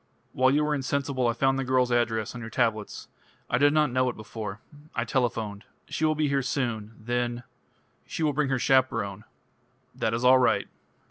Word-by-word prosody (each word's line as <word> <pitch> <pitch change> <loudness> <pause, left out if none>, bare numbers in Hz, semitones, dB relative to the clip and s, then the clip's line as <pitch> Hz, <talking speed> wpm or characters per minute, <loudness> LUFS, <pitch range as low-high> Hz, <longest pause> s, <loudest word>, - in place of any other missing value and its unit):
"While 130 0 +4
you 145 +3 +3
were 150 0 +1
insensible 140 -2 -1
I 115 - +2
found 135 +2 +1
the - - 0
girl's 130 -1 +2
address 115 -2 0
on 125 - -7
your 115 - -6
tablets. 110 -3 -1 0.4
I 120 - +2
did 145 +1 +5
not 150 -3 +2
know 130 0 +2
it 120 - -5
before. 105 -1 -7 0.4
I 115 - 0
telephoned. 115 -5 -1 0.3
She 155 - -1
will 155 0 +2
be 155 0 +1
here 140 -1 +1
soon. 120 -5 -2
Then 120 +1 -2 0.3
" - - -40
"She 165 - -3
will 150 -2 +2
bring 145 -1 0
her 135 - +1
chaperone." 115 -6 +1 0.7
"That 110 0 -1
is 120 +2 -2
all 130 +1 +7
right." 125 - +2
125 Hz, 195 wpm, -27 LUFS, 115-135 Hz, 0.7 s, all